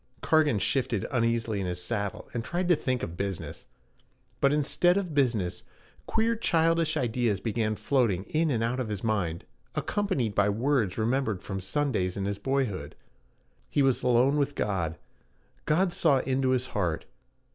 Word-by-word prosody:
Cargan 155 -7 +3
shifted 115 +1 0
uneasily 115 -3 0
in 95 - -2
his 90 0 -3
saddle, 100 +2 -3
and 120 - -2
tried 175 +6 -2
to 175 - +6
think 130 -4 -2
of 85 - -4
business. 100 0 -5 0.7
But 140 - +4
instead 150 +5 +2
of 180 -5 -2
business 115 -11 +1 0.5
queer 225 +1 +1
childish 165 -5 +2
ideas 120 -5 0
began 110 0 -1
floating 115 -8 +1
in 160 +7 0
and 115 -5 0
out 120 +3 -1
of 125 -4 -2
his 105 -3 -4
mind, 95 -7 -1 0.3
accompanied 190 - -1
by 100 +1 +3
words 115 -2 +1
remembered 110 -3 0
from 95 -1 -4
Sundays 95 -3 -1
in 100 - -2
his 100 0 -2
boyhood. 120 - -2 0.7
He 145 - +2
was 135 -2 +2
alone 125 +3 +3
with 140 0 0
God. 85 -6 -1 0.7
God 175 +3 +2
saw 155 -5 +3
into 130 0 0
his 130 -1 +1
heart. 90 -7 -1
120 Hz, 155 wpm, -28 LUFS, 100-145 Hz, 0.7 s, to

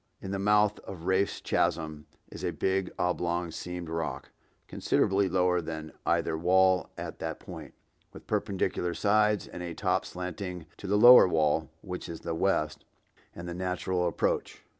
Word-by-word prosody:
In 95 - -6
the 100 - -2
mouth 105 +1 +3
of 90 -4 -9
Rafe's 95 +2 +1
Chasm 75 -2 -1 0.2
is - - -9
a - - +1
big 95 0 -1
oblong 85 -1 -1
seamed 90 +1 -6
rock, 80 0 -4 0.4
considerably 95 0 +1
lower 90 -1 +2
than 80 -1 -6 0.2
either - - +1
wall 95 +2 +3
at - - -6
that - - -4
point, - - -10 0.4
with - - -13
perpendicular 90 -2 -1
sides 105 0 +2
and 90 - -8 0.2
top 95 -1 +1
slanting 90 -1 -6
to 100 - -8
the 100 +2 +2
lower 120 -1 +9
wall, 80 -2 +1
which 90 -2 -6
is 85 - -7
the 85 - -3
west, 80 -3 0 0.5
and 85 0 -7
the 85 - -4
natural 90 0 -1
approach. 85 - -1
90 Hz, 155 wpm, -29 LUFS, 85-95 Hz, 0.5 s, lower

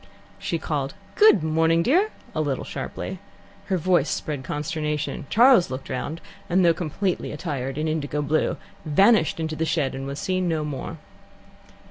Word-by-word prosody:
She 170 - -2
called, 150 -1 -3 0.2
"Good 415 - +6
morning, 165 +1 +3
dear," 365 - +3 0.2
a 155 - 0
little 140 -3 -1
sharply. 190 - -5 0.5
Her 190 -2 0
voice 175 -3 +2
spread 145 -4 -3
consternation. 150 0 -3
Charles 240 -4 +6
looked 130 +1 -6
round, 150 +6 -4 0.3
and 180 +1 +3
though 170 - +6
completely 180 +3 -2
attired 140 -4 -4
in 155 +1 -1
indigo 150 -1 -1
blue, 155 +2 +1 0.3
vanished 175 +2 +4
into 160 -1 -2
the 160 - -1
shed, 160 -4 0
and 135 +1 -5
was 140 0 -5
seen 185 +1 0
no 160 -2 0
more. 140 -3 -5
155 Hz, 155 wpm, -24 LUFS, 150-180 Hz, 0.5 s, Good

